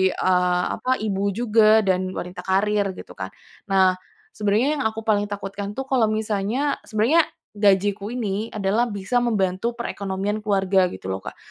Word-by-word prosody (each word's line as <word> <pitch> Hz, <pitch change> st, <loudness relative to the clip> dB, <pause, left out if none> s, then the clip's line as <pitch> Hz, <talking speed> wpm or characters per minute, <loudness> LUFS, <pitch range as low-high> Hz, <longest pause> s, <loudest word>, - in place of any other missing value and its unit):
eee, 180 Hz, -1 st, +2 dB, 0.2 s
apa 255 Hz, -, -4 dB
ibu 200 Hz, -2 st, -1 dB
juga, 220 Hz, -1 st, +4 dB
dan 185 Hz, -1 st, +2 dB, 0.2 s
wanita 180 Hz, +1 st, -6 dB
karir, 205 Hz, +2 st, +2 dB
gitu -, -, -10 dB
kan. 95 Hz, -, -3 dB, 0.4 s
Nah, 190 Hz, -1 st, +4 dB, 0.4 s
sebenarnya 210 Hz, +4 st, +1 dB
yang -, -, -1 dB
aku 220 Hz, 0 st, -5 dB
paling 205 Hz, -2 st, +1 dB
takutkan 200 Hz, 0 st, -5 dB
itu 270 Hz, -, -3 dB
kalau 260 Hz, -4 st, +2 dB
misalnya 215 Hz, +6 st, -1 dB
sebenarnya 230 Hz, +10 st, +3 dB, 0.3 s
gajiku 205 Hz, 0 st, +2 dB
ini 220 Hz, -3 st, -2 dB
adalah 215 Hz, +4 st, 0 dB
bisa 205 Hz, +4 st, 0 dB
membantu 215 Hz, 0 st, 0 dB
perkekonomian 200 Hz, -2 st, -3 dB
keluarga, 195 Hz, -3 st, +2 dB
gitu -, -, -10 dB
loh, 95 Hz, 0 st, -3 dB
Kak. -, -, -9 dB
205 Hz, 150 wpm, -23 LUFS, 195-220 Hz, 0.4 s, juga